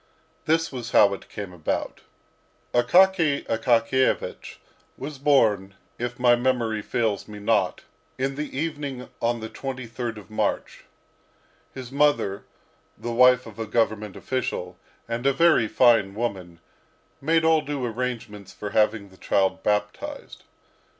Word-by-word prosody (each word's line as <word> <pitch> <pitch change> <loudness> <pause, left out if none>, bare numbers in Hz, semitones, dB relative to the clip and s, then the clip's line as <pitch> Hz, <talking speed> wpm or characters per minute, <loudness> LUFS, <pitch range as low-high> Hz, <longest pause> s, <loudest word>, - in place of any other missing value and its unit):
This 165 +1 +1
was 125 -3 -6
how 100 -1 +6
it 100 - -9
came 100 -3 -7
about. 85 -3 -3 0.7
Akaky 160 +4 +4
Akakiyevich 115 +3 0 0.4
was 140 0 -7
born, 110 -9 +2 0.2
if 120 0 -3
my 120 -1 +5
memory 120 -3 0
fails 110 -2 -1
me 105 -1 -9
not, 105 - 0 0.3
in 135 +1 -1
the 145 -1 -5
evening 145 -4 -4
on 120 0 0
the 110 - -4
23rd 120 -2 -5
of 105 0 -13
March. 110 - -2 0.9
His 130 -2 -8
mother, 140 -9 +1 0.5
the 120 - -5
wife 125 +1 +5
of 115 -1 -12
a 110 - -3
Government 110 -2 0
official, 95 -8 -3 0.3
and 120 +3 -2
a 140 - +4
very 155 -6 +4
fine 115 -5 +4
woman, 95 -7 -4 0.6
made 160 +3 +2
all 160 -1 +4
due 145 -3 -3
arrangements 115 -4 -5
for 105 -1 -7
having 105 -1 +1
the 95 - -19
child 95 0 +1
baptised. 105 0 -3
120 Hz, 130 wpm, -25 LUFS, 105-135 Hz, 0.9 s, how